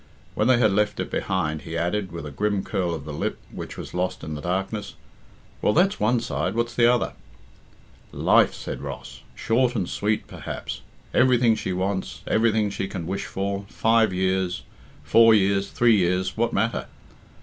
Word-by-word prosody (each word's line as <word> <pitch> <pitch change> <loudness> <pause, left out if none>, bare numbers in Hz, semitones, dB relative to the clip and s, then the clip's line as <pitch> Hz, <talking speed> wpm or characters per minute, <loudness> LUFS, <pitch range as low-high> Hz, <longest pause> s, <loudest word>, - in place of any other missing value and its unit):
When 105 - +1
they 130 -1 +5
had 110 -4 +4
left 105 +1 +1
it - - -3
behind, 80 -5 -1
he 80 +2 -5
added, 95 +3 -1
with 85 -2 -6
a 75 - -6
grim 100 +5 -1
curl 85 -3 -1
of 75 -3 -8
the 75 - -6
lip, - - -2
which - - -7
was - - -8
lost 90 +1 -2
in 80 - -5
the 75 - -5
darkness, 95 +4 -3 0.7
"Well, 105 - +3
that's 190 +4 +3
one 120 +3 +2
side. 115 - -2
What's 120 0 -1
the 120 0 +5
other?" 125 - 0 1.0
"Life," - - +4
said - - -6
Ross. - - -8
"Short 125 +2 +1
and 95 -6 -1
sweet, 105 +1 -1
perhaps. - - -6 0.3
Everything 125 -2 +4
she 95 - -3
wants, 95 +1 -2
everything 110 -2 +2
she 100 - -3
can 90 -3 -5
wish 95 +3 -3
for 100 +1 -3
five 115 -2 +3
years, 95 0 0 0.4
four 115 +9 +6
years, 100 -1 +2
three 120 -2 +4
years 90 0 +1
what 115 +1 +1
matter?" 115 0 0
100 Hz, 175 wpm, -24 LUFS, 90-115 Hz, 1.0 s, four